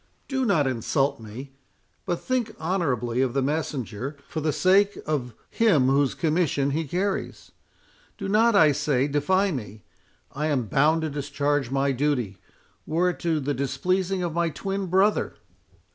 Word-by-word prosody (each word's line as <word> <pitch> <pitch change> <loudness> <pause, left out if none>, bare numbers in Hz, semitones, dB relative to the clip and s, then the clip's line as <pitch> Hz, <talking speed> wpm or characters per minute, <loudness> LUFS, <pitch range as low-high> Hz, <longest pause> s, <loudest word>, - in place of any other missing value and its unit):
—"Do 265 -2 -1
not 180 -10 +3
insult 135 +2 0
me; 115 +5 -9 0.6
but 175 -2 -1
think 245 -4 -2
honourably 130 - 0
of 130 -1 0
the 135 - +2
messenger, 140 -3 -3
for 155 - -4
the 155 0 +1
sake 200 +5 +3
of 125 -7 -2 0.2
Him 165 - +3
whose 140 0 +2
commission 155 -4 +1
he 160 +2 -2
carries.—Do 195 - -6
not, 220 +3 +4
I 160 -6 +6
say, 140 -2 +1
defy 185 +8 +1
me—I 125 - -7
am 140 -5 +1
bound 150 +8 +2
to 155 - -2
discharge 145 -1 -1
my 135 +1 +1
duty, 130 -7 -1 0.5
were 175 +3 +2
it - - -11
to 165 -3 0
the 145 0 -1
displeasing 180 +8 -1
of 170 -2 -2
my 170 0 +1
twin 195 +6 -3
brother." 190 +4 +2
150 Hz, 145 wpm, -25 LUFS, 135-185 Hz, 0.6 s, I